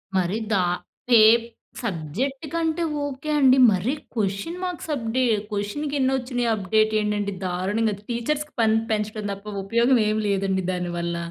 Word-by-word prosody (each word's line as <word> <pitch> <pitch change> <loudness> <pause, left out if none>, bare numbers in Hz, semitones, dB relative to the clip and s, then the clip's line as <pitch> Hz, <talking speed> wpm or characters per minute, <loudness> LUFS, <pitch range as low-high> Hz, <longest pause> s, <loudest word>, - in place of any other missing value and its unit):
మరి 185 +3 +1
దా 190 - +3 0.6
ఏ - - +8 0.6
సబ్జెక్ట్‌కంటే 270 - -2 0.2
ఓకె 285 +2 -6
అండి 265 -1 +6
మరి 200 +8 0 0.2
క్వెషన్ 210 - -2
మార్క్స్ 355 -3 -4
అప్డే 245 +1 -1 0.3
క్వెషన్‌కెన్ని 265 +7 -1
వచ్చినాయి 245 -2 -2
అప్డేట్ 215 +2 +1
ఏంటంటే 205 -1 -1
దారుణంగా 200 +4 0
టీచర్స్‌కి 295 +6 -2
పని 220 0 +4
పెంచడం 215 0 -2
తప్ప 200 +1 -8
ఉపయోగం 235 +5 +3
ఏమి 215 0 0
లేదండి 195 -1 0
దానివల్ల. 175 -1 -3
220 Hz, 120 wpm, -24 LUFS, 195-265 Hz, 0.6 s, ఏ